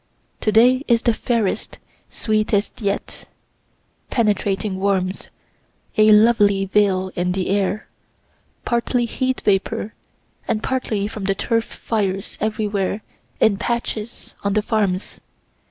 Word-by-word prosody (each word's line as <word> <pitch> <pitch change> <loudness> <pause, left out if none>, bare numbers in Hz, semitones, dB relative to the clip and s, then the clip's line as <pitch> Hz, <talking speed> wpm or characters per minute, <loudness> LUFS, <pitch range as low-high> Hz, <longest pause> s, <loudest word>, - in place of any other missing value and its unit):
To 215 - +1
day 250 +5 +5
is 235 -1 +3
the 235 - +3
fairest, 220 -3 -1 0.3
sweetest 215 0 -1
yet 200 -1 -3 0.8
penetrating 205 -3 0
warmth 190 -1 -1 0.7
a 215 0 +6
lovely 210 -2 +5
veil 190 -1 +2
in 180 0 0
the 185 -1 -2
air, 200 +1 0 0.8
partly 240 +1 +1
heat 260 +2 -2
vapor 200 +2 0 0.5
and 215 - -1
partly 220 -6 -1
from 210 -2 -6
the 195 0 +1
turf 230 +3 0
fires 195 -4 -2
everywhere 210 -2 -1 0.4
in 200 -2 +4
patches 235 0 -3
on 200 -1 0
the 215 0 +1
farms. 205 -4 -1
210 Hz, 115 wpm, -21 LUFS, 195-225 Hz, 0.8 s, a